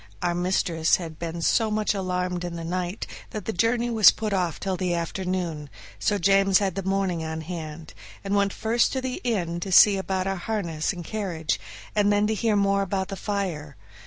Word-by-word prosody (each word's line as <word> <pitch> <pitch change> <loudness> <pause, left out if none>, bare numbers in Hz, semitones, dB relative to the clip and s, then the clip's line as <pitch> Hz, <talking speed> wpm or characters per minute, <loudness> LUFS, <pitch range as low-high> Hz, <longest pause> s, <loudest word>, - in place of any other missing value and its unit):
Our 175 -1 +1
mistress 175 -2 +2
had 165 -3 -7
been 170 0 -4
so 225 +5 +3
much 215 0 +1
alarmed 180 -2 -2
in 175 -1 -4
the 165 - -5
night 180 +3 -3 0.2
that 215 - -6
the 220 - -2
journey 235 +5 +1
was 220 -3 +8
put 215 -2 -2
off 180 -4 0
till 190 -1 -2
the 180 -1 -1
afternoon, 170 -3 -3 0.3
so 205 - +1
James 195 +1 +4
had 195 -3 0
the 195 - -3
morning 190 -3 -1
on 160 0 -4
hand, 160 -1 -7 0.3
and 195 0 -2
went 200 -1 +2
first 230 +4 +1
to 260 - -1
the 260 0 -4
inn 175 -8 -1
to 190 +2 -5
see 200 +2 +7
about 190 -1 -2
our 195 0 -1
harness 175 -6 -2
and 180 -3 -7
the - - -12
carriage, 180 -7 -2 0.4
and 205 -1 +3
then 205 0 +3
to 220 - +1
hear 220 0 +1
more 200 0 +2
about 190 -1 -2
the 195 - -4
fire. 180 -9 -3
190 Hz, 205 wpm, -25 LUFS, 170-205 Hz, 0.4 s, was